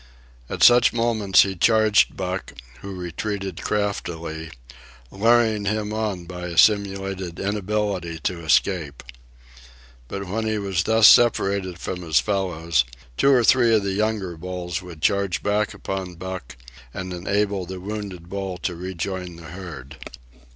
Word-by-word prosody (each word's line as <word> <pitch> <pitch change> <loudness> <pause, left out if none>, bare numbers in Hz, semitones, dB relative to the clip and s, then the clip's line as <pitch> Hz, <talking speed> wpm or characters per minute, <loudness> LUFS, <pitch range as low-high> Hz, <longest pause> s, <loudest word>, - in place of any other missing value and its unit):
At - - -1
such 120 0 +7
moments 115 -4 +4
he 95 -1 -3
charged 110 +2 +3
Buck, 90 -5 -4 0.3
who 100 -1 -7
retreated 95 +1 -4
craftily, 85 -6 -3 0.6
luring 110 0 +3
him 105 +1 -1
on 105 -5 -2
by 90 0 -6
a 85 -2 -7
simulated 95 -3 +2
inability 100 -4 -2
to 85 -2 -2
escape. 80 -1 +1 1.0
But 100 +6 -5
when 110 +4 -2
he 110 0 0
was 95 -4 -1
thus 110 -1 +6
separated 100 -6 +4
from 90 +1 -5
his 80 -4 +2
fellows, 85 -8 0 0.3
two 140 - +3
or 125 -3 +5
three 120 -1 +5
of 105 - +2
the 100 -1 -1
younger 105 -3 -1
bulls 90 0 -4
would 85 -4 -11
charge 100 -2 +1
back 105 +1 +1
upon 95 -2 -5
Buck 95 -7 -7 0.4
and 95 -1 -5
enable 100 +1 -1
the 95 0 -6
wounded 100 -3 -6
bull 95 -1 -4
to 90 +1 -3
rejoin 90 0 -5
the 85 -2 -11
herd. 85 -9 -9
95 Hz, 140 wpm, -23 LUFS, 90-105 Hz, 1.0 s, such